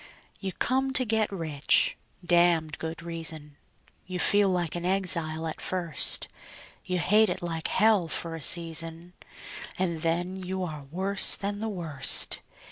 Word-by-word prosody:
You 195 -1 -3
come 265 +5 0
to 255 - +3
get 220 -2 0
rich 155 -6 +1 0.3
(damned 170 -3 +2
good 160 +1 -6
reason); 160 -3 -3 0.5
You 185 -1 -4
feel 205 +2 +3
like 175 -3 -1
an 175 - -4
exile 170 -4 0
at 160 - -5
first; 175 -5 +1 0.6
You 185 - -2
hate 210 +5 +3
it - - -4
like 165 -2 -3
hell 210 -4 +2
for 165 +1 -1
a 165 - -7
season, 165 +1 +1 0.6
And 170 -4 -2
then 175 +3 -2
you 190 0 -4
are 155 -5 -6
worse 190 +7 +2
than 205 +1 -4
the 220 +1 -3
worst. 165 -8 +3
175 Hz, 145 wpm, -27 LUFS, 165-190 Hz, 0.6 s, to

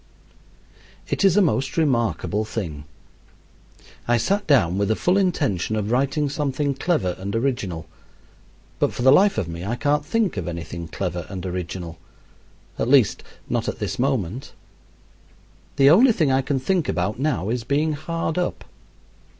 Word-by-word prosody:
It - - -1
is 195 -1 +4
a 205 - +6
most 135 -6 0
remarkable 120 -7 +1
thing. 85 -10 -5 1.2
I 120 0 +3
sat 200 - 0
down 100 - +3
with 100 - +1
the 110 - +1
full 180 - +1
intention 145 - 0
of 105 0 -2
writing 140 +4 +1
something 140 0 -1
clever 135 - 0
and 100 +3 -4
original; 110 -10 -2 0.9
but - - +1
for 120 - -4
the 130 - +7
life 200 +7 +5
of 85 - -1
me 85 +1 -6
I 110 +5 -2
can't 145 +3 +1
think 195 - 0
of 90 -2 -3
anything 85 0 -6
clever 90 0 -4
and 95 -2 -6
original 90 -2 -5 0.8
at 115 - 0
least, 130 -5 +4 0.3
not - - -1
at - - -5
this 130 - -4
moment. 125 -3 -1 1.2
The 140 0 +6
only 230 +8 +6
thing 155 -8 +1
I 130 +1 +3
can 135 0 -1
think 175 +4 0
about 95 +6 -1
now 135 - -1
is 120 0 -1
being 150 +5 0
hard 165 +3 -3
up. 180 - -2
130 Hz, 160 wpm, -23 LUFS, 95-150 Hz, 1.2 s, the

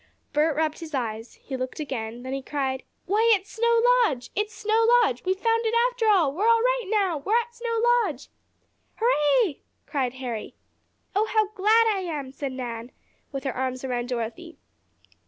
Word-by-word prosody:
Bert 300 +1 +2
rubbed 310 0 0
his 320 -3 -6
eyes. 225 -2 -4
He 270 - -7
looked 255 +2 -5
again, 235 -7 -4
and 245 +1 -11
then 260 - -4
he 275 - -3
cried: 265 -1 -2 0.2
"Why, 435 +5 +3
it's 385 0 -7
Snow 465 0 +2 0.2
Lodge! 250 - -2
It's 420 +1 -1
Snow 440 +1 +1 0.2
Lodge! 250 - -1
We've 375 +1 +1
found 455 +2 +1
it 450 - 0 0.2
after 485 -3 -1
all! 355 -10 +4
We're 400 +8 0
all 460 0 +5
right - - +1
now! 390 -6 +1
We're 420 +11 +2
at 475 0 -6
Snow 470 -1 -2 0.2
Lodge!" 305 - -4 0.7
"Hurray!" 420 - +2 0.3
cried 260 -4 -1
Harry. 245 -4 -5 0.6
"Oh, 425 +2 +2
how 435 -2 +2
glad 430 +3 +4
I 395 - -2
am!" 300 -8 -4
said 275 0 -5
Nan, 240 -2 -6 0.4
with 275 -2 -5
her 270 -3 -2
arms 255 0 -3
around 245 -2 -2
Dorothy. 255 +8 -5
315 Hz, 180 wpm, -25 LUFS, 260-435 Hz, 0.7 s, all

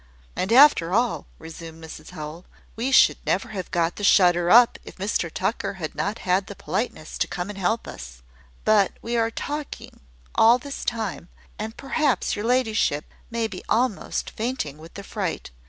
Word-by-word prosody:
"And 190 - -2
after 235 - +6
all," 235 +1 0
resumed 165 0 -10
Mrs 155 -1 -10
Howell, 160 0 -8 0.3
"we 245 +4 -2
should - - +6
never - - 0
have 190 -4 -5
got 170 -1 0
the 205 - -6
shutter 175 -3 +5
up, 240 +4 +6
if - - -11
Mr 190 -4 -1
Tucker 195 +2 -2
had 160 -5 -5
not 205 +3 -2
had 185 +1 +2
the 200 - -8
politeness 185 -1 -4
to - - +1
come 180 +2 -4
and 205 - -7
help 195 +5 0
us. - - -10 0.4
But 210 -3 +4
we 235 +1 -2
are 230 -1 +2
talking 290 +5 -6 0.3
all 230 +2 +6
this 280 +2 -7
time, 220 -6 -3 0.3
and 220 +2 -5
perhaps 275 -4 0
your 205 - -4
ladyship 225 - +1 0.2
may 230 -1 -1
be 195 -4 -6
almost 240 -3 0
fainting 215 - -3
with 165 +1 -13
the 200 - -7
fright. 195 - -4
200 Hz, 170 wpm, -24 LUFS, 170-230 Hz, 0.4 s, after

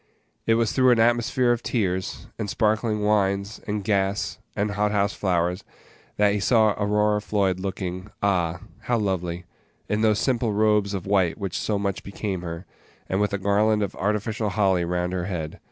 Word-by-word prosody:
It 115 - +5
was 115 -1 +1
through 130 -1 +4
an 120 -2 +4
atmosphere 120 +2 +3
of 120 -1 0
tears, 95 -7 -2
and 105 -2 -2
sparkling 110 0 +1
wines, 100 0 +1
and 105 -1 -2
gas, 100 -1 0 0.2
and 105 +1 0
hot 105 +1 0
house 100 0 +1
flowers, 90 -1 0 0.5
that 105 -1 +4
he 105 - 0
saw 110 +2 +4
Aurora 105 +1 +1
Floyd, 100 -3 0
looking 95 0 -4
ah! 90 -4 +1 0.2
how 120 - 0
lovely, 90 -4 -2 0.4
in 105 +1 0
those 110 -2 +3
simple 120 -3 0
robes 105 -1 +2
of 95 - -5
white 95 -4 +2
which 95 -3 -4
so 105 - -1
much 100 -1 -2
became 100 -2 -4
her, 85 +1 -6 0.4
and 95 +2 0
with 105 - +1
a 100 - 0
garland 105 +2 +2
of 100 - -4
artificial 105 +2 -1
holly 95 -2 +2
round 90 +1 -1
her 90 -1 -2
head. 85 -5 -4
100 Hz, 175 wpm, -24 LUFS, 95-105 Hz, 0.5 s, It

